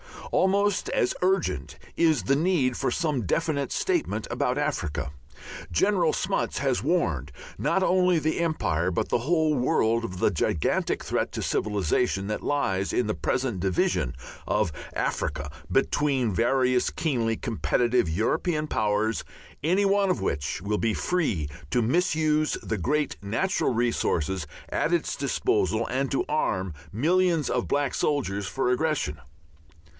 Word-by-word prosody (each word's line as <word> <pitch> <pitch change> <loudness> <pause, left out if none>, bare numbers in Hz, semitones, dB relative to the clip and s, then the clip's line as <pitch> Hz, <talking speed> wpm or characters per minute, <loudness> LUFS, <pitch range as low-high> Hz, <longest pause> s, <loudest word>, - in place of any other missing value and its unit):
Almost 200 +1 +2
as 125 - +1
urgent 180 - 0 0.2
is 160 - +3
the 135 +8 +2
need 155 -7 +2
for - - 0
some 150 - -1
definite 145 - 0
statement 340 - -1
about 125 +2 0
Africa. 85 - -2 0.6
General 175 - +2
Smuts 195 +1 -1
has 135 -3 +1
warned 85 - 0 0.3
not 170 +6 +1
only 180 -1 +3
the 155 +1 0
Empire, 90 - 0
but 85 - -1
the - - +2
whole 155 +4 +2
world 120 -4 +2
of 90 -4 -6
the - - +3
gigantic 75 - 0
threat - - -1
to - - -3
civilization 100 +1 0
that 105 - -2
lies 95 -10 0
in 125 - +2
the 105 - 0
present 130 -7 -1
division 85 -8 0 0.3
of 95 -6 +1 0.2
Africa 70 - -2 0.2
between 135 -4 +1
various 125 +3 +2
keenly 120 -8 0
competitive 120 -2 +1
European 150 - 0
Powers, 105 -2 0 0.4
any 185 +6 +3
one 200 0 +3
of 180 - 0
which 70 +3 -2
will 105 +1 -1
be 115 -1 +1
free 130 - 0 0.2
to 120 - +2
misuse 155 +2 +2
the 110 - -2
great 150 - 0
natural 115 - 0
resources 95 -8 0 0.2
at - - 0
its - - 0
disposal 110 +5 0
and 135 +1 -1
to 135 - 0
arm 95 - -1 0.2
millions 165 - +2
of 125 - 0
black 140 -2 0
soldiers 100 -10 -1
for 125 +5 0
aggression. 125 - 0
130 Hz, 140 wpm, -26 LUFS, 105-160 Hz, 0.6 s, is